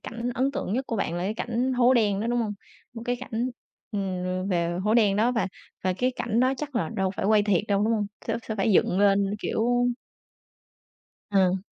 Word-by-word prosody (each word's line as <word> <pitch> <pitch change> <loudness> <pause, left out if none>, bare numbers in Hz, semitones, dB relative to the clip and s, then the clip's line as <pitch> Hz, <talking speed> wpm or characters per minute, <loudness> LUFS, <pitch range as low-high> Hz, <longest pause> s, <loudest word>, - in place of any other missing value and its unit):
cảnh 235 +1 -4
ấn 260 +3 +1
tượng 235 - -3
nhất 260 +4 0
của 230 - -2
bạn 170 -4 -1
là 175 - -2
cái 210 +3 -1
cảnh 240 +3 -1
hố 250 +1 +4
đen 205 -4 +2
đó, 225 - -1
đúng 240 0 +1
hông? 210 -2 -2 0.4
Một 230 - -7
cái 245 0 0
cảnh, 245 -1 -3 0.4
ừm, 185 -1 -2
về 175 -1 0
hố 215 +2 +2
đen 205 -4 +4
đó, 235 +4 +3
và 230 - 0 0.4
và 185 - +2
cái 250 +7 0
cảnh 230 +1 0
đó 260 +1 +3
chắc 290 -3 -6
là 165 -8 0
đâu 190 -1 +1
phải - - -2
quay 215 -1 +5
thiệt 200 -3 +2
đâu, 200 0 +2
đúng 230 - +2
hông? 210 -2 0 0.2
Sẽ - - 0
sẽ 220 - -1
phải 205 +2 +2
dựng 185 0 +3
lên, 200 0 +4
kiểu 245 +3 +1 1.4
Ờ. 190 -2 +3
215 Hz, 220 wpm, -26 LUFS, 195-240 Hz, 1.4 s, quay